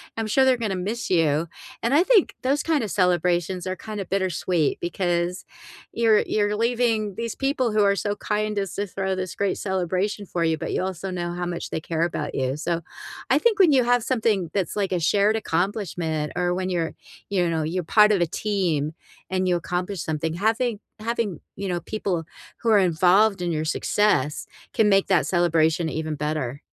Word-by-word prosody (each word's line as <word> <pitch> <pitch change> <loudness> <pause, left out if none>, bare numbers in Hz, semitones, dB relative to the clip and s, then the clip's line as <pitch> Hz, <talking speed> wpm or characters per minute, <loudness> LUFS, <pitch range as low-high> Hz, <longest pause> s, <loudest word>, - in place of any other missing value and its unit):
I'm 225 -1 -2
sure 265 +5 +3
they're 260 -1 +5
gonna 215 -5 -2
miss 205 +6 -3
you, 165 -2 +2 0.4
and 235 +4 +1
I 315 - +5
think 420 -3 +4
those 275 +3 +1
kind 315 -5 +1
of 210 - -4
celebrations 180 -1 +1
are 185 - -2
kinda 210 -2 -6
bittersweet 180 -3 0
because 175 0 -1 0.5
you're 225 -2 +4
you're 210 0 +1
leaving 230 -3 0
these 230 +1 -4
people 270 -3 0
who 210 0 +3
are 200 0 +3
so 205 +1 -2
kind 210 0 -2
as 195 -3 -3
to 205 +1 -2
throw 190 0 -2
this 185 -1 -4
great 200 -1 0
celebration 190 +2 -1
for 170 -2 -2
you, 160 -1 +1
but - - -4
you - - 0
also 190 0 -4
know 175 -1 -3
how 175 0 -3
much 175 -1 -4
they 160 - -2
care 165 0 -1
about 160 -3 -3
you. 130 0 0
So, 170 +2 -2 0.5
I - - +5
think 455 -3 +2
when 355 -5 +6
you 260 -2 +5
have 245 -1 +2
something 220 -9 0
that's, 195 -3 -1
like, 195 -2 0
a 180 - +1
shared 205 +6 +3
accomplishment 175 -6 -2
or 175 0 +1
when 185 +1 -2
you're, 170 -3 -1 0.4
you 180 -3 +1
know, 160 -2 0
you're 175 +3 -2
part 210 +5 +5
of 190 - +1
a - - +4
team 170 -5 -1 0.4
and 185 0 0
you 180 - +3
accomplish 180 +2 -3
something, 160 +1 -2
having 225 +3 0 0.2
having, 225 -7 -2 0.2
you 200 +1 -4
know, 175 -2 -2
people 190 -6 -2 0.4
who 230 - 0
are 215 - +6
involved 185 +3 +3
in 175 -1 -1
your 155 0 -1
success 185 -2 +1 0.3
can 220 - +3
make 195 -1 +3
that 185 -8 +3
celebration 165 -1 +2
even 155 0 -3
better. 145 -2 -3
185 Hz, 195 wpm, -24 LUFS, 170-215 Hz, 0.5 s, when